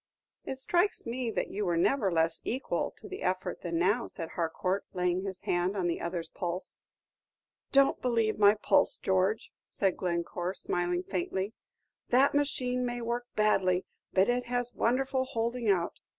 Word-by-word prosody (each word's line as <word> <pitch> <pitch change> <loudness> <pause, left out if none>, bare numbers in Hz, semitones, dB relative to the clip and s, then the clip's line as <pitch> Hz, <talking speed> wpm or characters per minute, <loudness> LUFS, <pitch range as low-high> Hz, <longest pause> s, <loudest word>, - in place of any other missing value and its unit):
"It 265 - -4
strikes 345 +9 +1
me 240 0 -2
that - - -2
you 210 - -2
were 175 -3 +1
never 205 +2 +2
less 165 -1 +1
equal 260 +4 -1
to - - -10
the 385 0 -7
effort 185 0 -2
than 170 -2 -2
now," 200 +8 +2
said 165 -4 -6
Harcourt, 185 +3 -1
laying 180 0 +1
his 190 -2 -5
hand 180 +3 0
on 185 - 0
the 170 -1 -1
other's 170 -1 -4
pulse. 175 +1 -4 0.9
"Don't 275 0 +4
believe 230 -4 +1
my 205 0 +7
pulse, 215 - +3
George," 190 +3 0 0.2
said 195 -2 0
Glencore, 175 +1 -2
smiling 175 0 -1
faintly. 190 +3 -2 0.6
"The 265 +3 +5
machine 255 -3 +1
may 245 0 -2
work 240 +1 -2
badly, 190 -4 +2 0.3
but 190 +1 +4
it 245 0 +1
has 245 0 -1
wonderful 260 +2 +1
holding 235 -2 -1
out. 175 -3 +1
200 Hz, 160 wpm, -30 LUFS, 180-245 Hz, 0.9 s, my